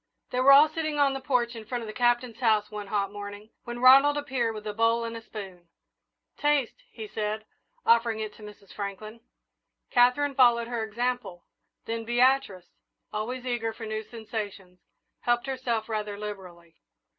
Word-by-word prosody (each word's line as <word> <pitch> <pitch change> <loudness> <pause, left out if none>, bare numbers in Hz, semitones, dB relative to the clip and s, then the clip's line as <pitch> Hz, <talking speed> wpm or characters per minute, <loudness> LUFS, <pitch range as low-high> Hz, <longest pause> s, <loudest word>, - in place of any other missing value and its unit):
They 250 - -1
were 265 +2 +7
all 285 +3 +9
sitting 310 -1 -3
on 280 -1 +3
the 270 - -3
porch 245 -3 0
in 225 - -7
front 240 +2 -4
of - - -7
the 215 - -6
Captain's 240 -1 +1
house 215 -4 +2
one 210 -1 -6
hot 200 -1 -1
morning, 205 +1 -9
when 240 0 -5
Ronald 270 +4 +7
appeared 255 -6 -1
with 215 0 -8
a 210 - -3
bowl 230 +2 +2
and 230 0 -5
a 230 - -7
spoon. 190 -6 -10 0.7
"Taste," 295 - +1
he 435 - -8
said, 215 - -3 0.4
offering 230 -1 +3
it 215 -1 -4
to - - -17
Mrs. 210 -2 -13
Franklin. 210 +3 -6 0.7
Katherine 250 +4 +4
followed 240 -3 +4
her 235 -2 -2
example, 235 -4 -3 0.4
then 230 0 -3
Beatrice, 240 -5 +2 0.5
always 245 +4 -4
eager 235 -3 -2
for 225 0 -8
new 215 0 -3
sensations, 210 -5 -7 0.4
helped 240 0 +1
herself 250 -5 -2
rather 210 -2 -3
liberally. 180 -5 -9
230 Hz, 170 wpm, -27 LUFS, 210-250 Hz, 0.7 s, all